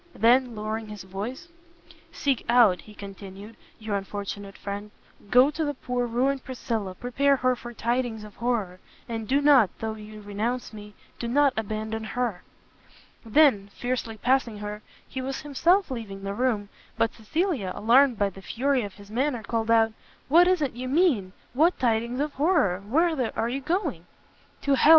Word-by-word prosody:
then, 245 +1 +4
lowering 215 +1 -3
his 210 -2 -8
voice, 205 - -6 0.6
"seek 275 -4 0
out," 230 -7 +5
he 215 - -14
continued, 200 +2 -10 0.2
"your 215 -2 -3
unfortunate 200 0 -5
friend, 200 +1 -5 0.4
go 255 +5 +6
to 315 +2 -2
the 290 -1 -2
poor 250 -1 -2
ruined 260 +3 0
Priscilla, 225 -7 -3
prepare 270 +6 +2
her 255 -1 +2
for 240 0 -9
tidings 235 -1 -1
of 210 -2 -12
horror! 220 -7 -1 0.3
and 225 -2 -4
do 275 +5 +3
not, 280 -8 +6
though 220 -1 -3
you 215 0 -10
renounce 220 +5 -3
Me, 210 -1 -10 0.2
do 235 - -3
not 280 +2 +3
abandon 220 +1 -3
Her!" 230 -4 -2 0.8
Then, 225 -4 +4
fiercely 245 -3 -3
passing 245 -1 +1
her, 210 0 -6 0.3
he 260 - -5
was 270 +1 -4
himself 330 +6 +2
leaving 205 -6 -6
the 200 0 -3
room; 215 -3 0 0.3
but 225 - +1
Cecilia, 255 - -1
alarmed 245 +3 +4
by 200 -1 +1
the 195 - -12
fury 265 +6 0
of 205 -3 -6
his 205 0 -14
manner, 250 0 0
called 225 -1 -2
out, 225 -1 +4 0.4
"What 345 +5 +7
is 365 -4 +3
it 270 - -1
you 250 +2 -5
mean? 265 - +2 0.2
what 320 +7 +3
tidings 235 +1 0
of 295 0 -1
horror? 285 - +2
whither 270 - +1
are 225 +1 0
you 270 +3 -3
going?" 300 - -2 0.6
"To 280 - +2
hell!" 275 - +4
235 Hz, 170 wpm, -26 LUFS, 210-265 Hz, 0.8 s, What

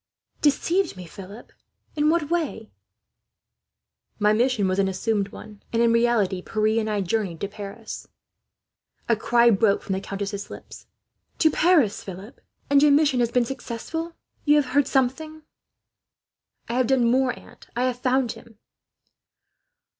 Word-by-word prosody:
"Deceived 335 - +1
me, 180 - -8
Philip! 195 +6 -11 0.4
In 300 0 +2
what 325 -2 0
way?" 300 -10 -2 1.5
"My 210 +1 +3
mission 230 -3 +2
was 185 +1 0
an 195 - +3
assumed 200 +2 -1
one," - - -10
Philip 210 -1 -15
said; - - -39
"and 230 0 +3
in 230 0 +4
reality, 230 -6 +2
Pierre 215 +3 0
and 220 -1 -2
I 210 -1 0
journeyed 190 -3 -2
to 200 - -1
Paris." 205 +2 -8 1.0
A 230 - +3
cry 235 +2 +4
broke 200 -1 +2
from 195 - -3
the 190 - -2
countess's 200 0 -5
lips. - - -11 0.5
"To 315 - +4
Paris, 310 - +3
Philip! 195 +6 -10 0.3
And 280 0 +4
your 295 0 +5
mission 285 -3 +3
has 240 -1 +2
been 240 0 +2
successful? 320 +7 -5 0.3
You 295 -1 +4
have 280 -4 +1
heard 285 0 +3
something?" 305 +4 -1 1.2
"I 230 - -4
have 250 -1 +1
done 260 -2 +3
more, 255 +2 +2
aunt, - - -16
I 245 - 0
have 250 -1 -1
found 255 -1 +1
him." 225 -2 -14
235 Hz, 155 wpm, -24 LUFS, 205-270 Hz, 1.5 s, your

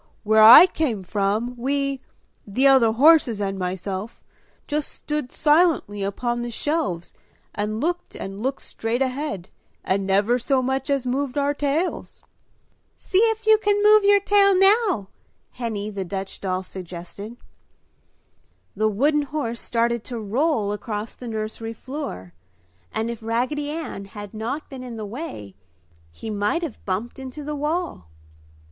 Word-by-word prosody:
"Where 220 0 +4
I 230 +10 +11
came 270 - -2
from, 210 +5 -1
we 275 +1 -1 0.5
the 250 +7 +1
other 265 -5 +6
horses 260 -3 +5
and 195 -1 -2
myself 190 +3 -4 0.4
just 300 -1 -2
stood 300 -4 -4
silently 300 - +2
upon 240 +5 -2
the 240 - -4
shelves 220 - -2 0.4
and 215 +1 -2
looked 350 +5 -2
and 195 +1 -7
looked 265 +3 -2
straight 230 +4 -1
ahead, 260 - -4 0.3
and 195 0 0
never 205 +6 +2
so 260 +1 +1
much 265 +1 -2
as 275 -2 0
moved 260 +1 -2
our 285 0 +2
tails." 290 +5 -2 0.7
"See 375 - 0
if 445 0 +2
you 435 0 +6
can 410 -1 +1
move 425 0 +7
your 405 0 +6
tail 395 -1 +4
now!" 390 - +3 0.4
Henny, 215 -4 -4
the 200 -2 -4
Dutch 190 +1 -6
doll, 185 -1 -2
suggested. 185 +5 -9 1.4
The 215 +2 +2
wooden 290 +8 +2
horse 275 -5 -3
started 235 -1 0
to 245 - -5
roll 220 0 0
across 210 +1 -4
the 245 - -10
nursery 220 0 -4
floor 225 - -7 0.6
and 225 +1 -2
if 235 - -8
Raggedy 255 +6 -1
Ann 305 -10 -5
had 205 +1 -9
not 235 +8 -4
been 265 -2 -9
in 245 -2 -7
the 215 - -5
way, 210 - -7 0.6
he 220 - -7
might 210 +11 0
have 300 -9 -6
bumped 210 +7 -3
into 265 +3 -7
the 300 +1 -4
wall. 300 - -3
240 Hz, 145 wpm, -23 LUFS, 205-295 Hz, 1.4 s, I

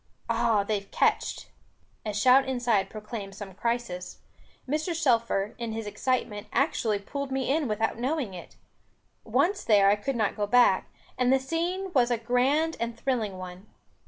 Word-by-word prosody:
Ah 230 -3 +2
they've 200 -1 -3
catched." - - 0 0.6
A - - 0
shout 255 +6 +5
inside 240 -7 +1
proclaimed 210 -2 -7
some 200 -2 -8
crisis; 225 -5 -3 0.5
Mr. 310 +5 -1
Shelfer, 230 -8 +1
in 230 -2 -3
his 225 0 -4
excitement, 210 0 -2
actually 235 -7 +1
pulled 275 +7 -5
me 265 0 0
in 310 -4 0
without 220 +1 -1
knowing 260 -4 -1
it. 175 - -10 0.7
Once 395 +3 +1
there, 200 -2 +5
I - - +4
could 255 +6 -3
not 215 -3 0
go 205 -1 -1
back; 245 +3 +4 0.3
and 250 0 +3
the 265 - +5
scene 350 +7 -2
was 250 -4 +4
a 240 - +1
grand 260 +8 +1
and 235 0 -3
thrilling 225 -7 -1
one. 185 +2 -9
235 Hz, 160 wpm, -27 LUFS, 205-265 Hz, 0.7 s, shout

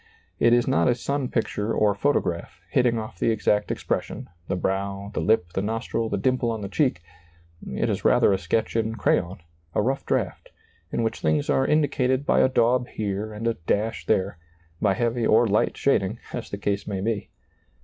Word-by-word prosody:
It 120 - +4
is 120 0 +4
not 135 - +3
a 125 - +3
sun 140 +2 -2
picture 110 -2 -1
or 105 -1 +3
photograph, 100 -7 -1
hitting 120 -2 +3
off 110 -5 -6
the - - +2
exact 105 -2 +1
expression, - - -3 0.2
the - - -1
brow, 100 +2 -2
the - - -2
lip, 90 -6 +1
the 95 - 0
nostril, 115 +1 -2
the - - -1
dimple 125 +3 +1
on 110 -2 -3
the 100 - -5
cheek; 125 - 0 0.7
it - - 0
is - - -2
rather - - +4
a 95 - 0
sketch 110 +3 -1
in 110 0 0
crayon, 90 -3 0 0.3
a - - +3
rough 135 +4 -1
draft, - - -2 0.4
in 115 - 0
which 115 0 -2
things 75 -2 +1
are 135 - +2
indi 150 -1 +3
cated 130 +1 0
by - - +3
a - - +5
daub 125 0 +2
here 105 0 -3
and 105 +2 -6
a 115 - +2
dash 110 +2 -1
there; 95 -2 +1 0.4
by 100 -2 +3
heavy 120 +2 0
or 115 +2 +5
light 105 +1 +1
shading 110 -6 +1 0.2
as 120 - -5
the 100 - -4
case 100 -1 -2
may 100 -2 -2
be. 110 0 -2
110 Hz, 195 wpm, -25 LUFS, 100-120 Hz, 0.7 s, a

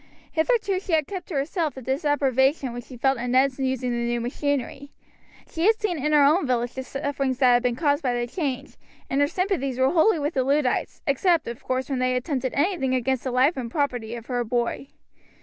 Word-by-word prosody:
Hitherto 395 +3 +1
she 375 -2 -5
had 310 -2 +3
kept 370 -1 -7
to 335 - -6
herself 310 +3 -1
the 265 - -8
disapprobation 270 -1 +1
which 245 0 -7
she 255 - -11
felt 270 +1 +1
at 245 +1 -3
Ned's 260 +2 +2
using 260 -2 -1
the 240 - -1
new 235 0 -1
machinery. 275 +2 -3 0.6
She 335 +3 0
had 445 0 +4
seen 350 -10 -2
in 300 - +1
her 295 -1 +6
own 300 +3 +3
village 245 -1 0
the 260 - -4
sufferings 275 0 -2
that 255 -2 +5
had 245 - +4
been 245 -1 0
caused 285 +2 +1
by 250 -4 0
the 240 0 -1
change, 275 0 -4 0.3
and 275 +1 +2
her 285 - +4
sympathies 300 -8 -1
were 260 +1 +3
wholly 345 +3 +4
with 295 +2 -2
the 260 - +1
Luddites, 275 -1 0
except 325 +3 +2
of 235 0 -7
course 260 0 -2
when 270 -3 -2
they 255 0 +1
attempted 260 0 -2
anything 285 -4 +1
against 255 0 0
the - - 0
life 255 +6 +3
and 250 -3 -4
property 245 -5 -2
of 230 -1 -8
her 245 -1 -1
boy. 240 +3 -2
270 Hz, 220 wpm, -24 LUFS, 250-300 Hz, 0.6 s, her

